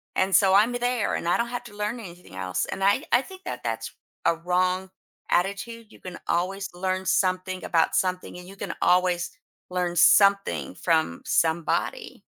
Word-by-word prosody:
and 190 +1 +1
so 190 -1 +5
I'm 215 +4 +5
there, 245 -2 0
and - - -3
I 175 - +3
don't 235 0 -1
have 245 0 -4
to 205 - -12
learn 210 +3 -3
anything 175 - -11
else." 90 -1 -2
And 195 - -5
I 200 +1 +3
I 245 - +5
think 375 +5 -13
that - - -5
that's - - -3 0.3
a 165 - +4
wrong 180 +2 0 0.4
attitude. 215 +5 -1
You - - -16
can 180 -2 -9
always 195 +3 -1
learn 185 +1 -2
something 185 +1 0
about 165 -2 +2
something, 185 -1 -1
and 180 - -12
you 195 - -11
can 195 -3 -5
always 180 -1 +2 0.4
learn 180 -1 -1
something 200 +2 +4
from 160 - 0
somebody. 165 0 0
185 Hz, 175 wpm, -25 LUFS, 180-205 Hz, 0.4 s, so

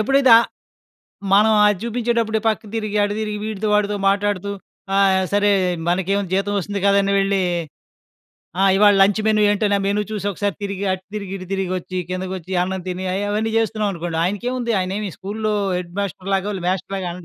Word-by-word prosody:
ఎప్పుడైతే 270 +3 +3
ఆహ్, 235 - 0 0.9
మనం 215 +2 +5
అది 205 -3 +2
చూపించేటప్పుడు 235 -1 0
పక్కకు 215 -1 -2
తిరిగి 215 -1 -3
అటు 205 0 -2
తిరిగి 210 -1 -3
వీడితో, 215 -1 -3
వాడితో 210 0 +1
మాట్లాడుతూ, 200 0 0 0.5
ఆహ్, 190 -1 +4
సరే 205 0 +3 0.4
మనకేముంది 190 +1 0
జీతం 205 +1 -1
వస్తుంది 200 +1 -4
కదాని 200 0 +3
వెళ్ళి, 195 -1 +1 1.2
ఆ! - - +4
ఇవాళ 205 0 +6
లంచ్ 205 +2 +3
మెను 215 -1 +3
ఏంటని 205 0 +1
ఆ - - -3
మేను 205 +1 +1
చూసి 205 -1 -3
ఒకసారి 200 -1 -2
తిరిగి, 200 0 -3
అటు 185 0 -5
తిరిగి, 200 -2 -6
ఇటు 185 - -9
తిరిగి, 190 -2 -1
ఒచ్చి, 185 +1 -6
కిందకోచ్చి, 185 0 -5
అన్నం 190 0 -3
తిని 180 +1 -4
అయి 200 +1 -1
అవన్నీ 220 +2 -1
చేస్తున్నామనుకోండి. 200 -7 -2
ఆయనకేముంది 235 +5 -2
ఆయనేమి 195 +2 -3
స్కూలు‌లో 215 +2 -2 0.2
హెడ్ 175 -1 -5
మాస్టర్‌ 195 0 -4
లాగో 195 +2 -1 0.2
వ్యస్టర్‌లాగా 190 0 -2
200 Hz, 165 wpm, -20 LUFS, 190-210 Hz, 1.2 s, ఇవాళ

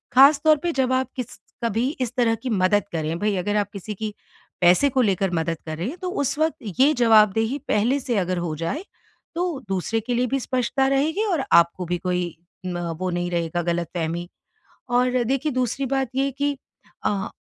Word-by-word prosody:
ख़ासतौर 295 +3 +7
पे, 345 - +1
जब 260 -1 +1
आप 260 0 +1
किस 250 -2 -6 0.3
कभी 230 +3 +1
इस 250 -2 -1
तरह 235 -3 +2
की 255 +3 -6
मदद 205 0 +2
करें। 160 0 -2
भई, 210 +1 +1
अगर 205 +3 -1
आप 205 -1 0
किसी 200 +2 -6
की 215 +1 -4 0.5
पैसे 180 +11 +5
को 260 0 +2
लेकर 195 -4 +1
मदद 165 0 -1
कर 155 0 -4
रहे 175 +7 -3
हैं, 325 - -7
तो 365 - -2
उस 285 -5 -1
वक़्त 315 0 +2 0.2
ये 280 +4 +6
जवाबदेही 225 +1 +4
पहले 240 +7 +2
से 245 -4 -2
अगर 185 -1 0
हो 170 -3 -3
जाए, 170 - -3 0.5
तो 345 -4 -1
दूसरे 195 +4 -1
के 245 +3 -3
लिए 250 +1 +1
भी 275 +3 0
स्पष्टता 260 +1 0
रहेगी 305 +9 +1
और 345 -10 0
आप 170 0 +6
को 180 - -4
भी 175 +1 -1
कोई 180 -2 -2 0.3
म 180 -1 -3 0.2
वो 185 - -1
नहीं 175 0 -2
रहेगा, 170 0 -1
ग़लतफ़हमी। 170 0 -2 0.6
और 250 0 +2
देखिए, 275 +5 0
दूसरी 255 +2 -1
बात 270 0 0
ये 270 - +2
है 275 - 0
कि 285 +1 -1 0.5
अ, 200 -1 0
225 Hz, 200 wpm, -23 LUFS, 180-270 Hz, 0.6 s, ख़ासतौर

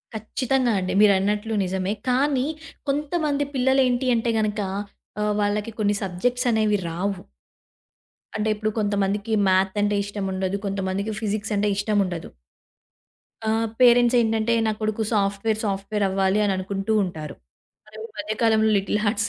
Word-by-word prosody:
ఖచ్చితంగా 245 +3 0
అండి. 185 0 -2
మీరన్నట్లు 210 +2 +3
నిజమే. 190 +2 -1 0.2
కానీ 265 +1 +2 0.4
కొంతమంది 290 0 0
పిల్లలేంటి 260 -1 +2
అంటే 230 0 0
గనక 215 -1 -1 0.6
ఆహ్, 210 0 +1
వాళ్ళకి 205 +2 -1
కొన్ని 205 -1 +2
సబ్జెక్ట్స్ 245 +7 -1
అనేవి 215 -2 +2
రావు. 190 +4 -2 1.2
అంటే 215 +1 0
ఇప్పుడు 215 +1 -1
కొంతమందికి 205 +1 0
మ్యాథ్ 190 +1 +2
అంటే 205 0 +1
ఇష్టం 205 -1 -4
ఉండదు. 190 +1 -1
కొంతమందికి 195 +1 -2
ఫిజిక్స్ 215 0 -2
అంటే 205 +1 +1
ఇష్టం 205 +1 0
ఉండదు. 175 -3 -5 1.2
ఆహ్, 225 +1 +1
పేరెంట్స్ 245 0 +6
ఏంటంటే, 225 0 +1
"నా 220 - +2
కొడుకు 215 +1 -1
సాఫ్ట్‌వేర్, 205 +1 0
సాఫ్ట్‌వేర్ 200 +1 -1
అవ్వాలి" 190 +1 +1
అని 200 - +1
అనుకుంటూ 195 +3 -2
ఉంటారు. 160 -5 -6 0.7
ఈ - - -5
మధ్య 210 +1 -3
కాలంలో 220 -1 +4
'లిటిల్ 200 +2 0
హార్ట్స్' 210 0 +1
210 Hz, 135 wpm, -24 LUFS, 195-225 Hz, 1.2 s, పేరెంట్స్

